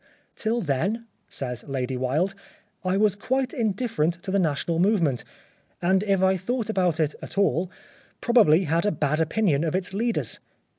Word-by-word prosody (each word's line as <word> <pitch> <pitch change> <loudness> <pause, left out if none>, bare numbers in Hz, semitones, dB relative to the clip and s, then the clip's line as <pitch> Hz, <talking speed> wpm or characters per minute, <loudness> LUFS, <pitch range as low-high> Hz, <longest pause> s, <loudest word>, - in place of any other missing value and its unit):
" - - -38
Till 230 +2 -1
then," 195 - -1 0.2
says 125 -3 -5
Lady 130 -1 -2
Wilde, 140 +10 0 0.3
" 210 -1 -42
I 190 - +2
was 205 -1 +3
quite 260 +5 -1
indifferent 215 -7 0
to 190 - -3
the 200 - +2
National 165 0 0
movement, 175 - +2 0.6
and 190 +2 +2
if 195 -2 +1
I 190 0 +4
thought 225 +3 -2
about 180 -5 +1
it 155 -2 +1
at - - -9
all, 185 -3 +2 0.5
probably 205 -9 +5
had 165 +4 +1
a - - +3
bad 155 -1 0
opinion 160 -3 +1
of 165 0 -1
its 185 0 -2
leaders. 230 +3 0
185 Hz, 175 wpm, -25 LUFS, 155-210 Hz, 0.6 s, probably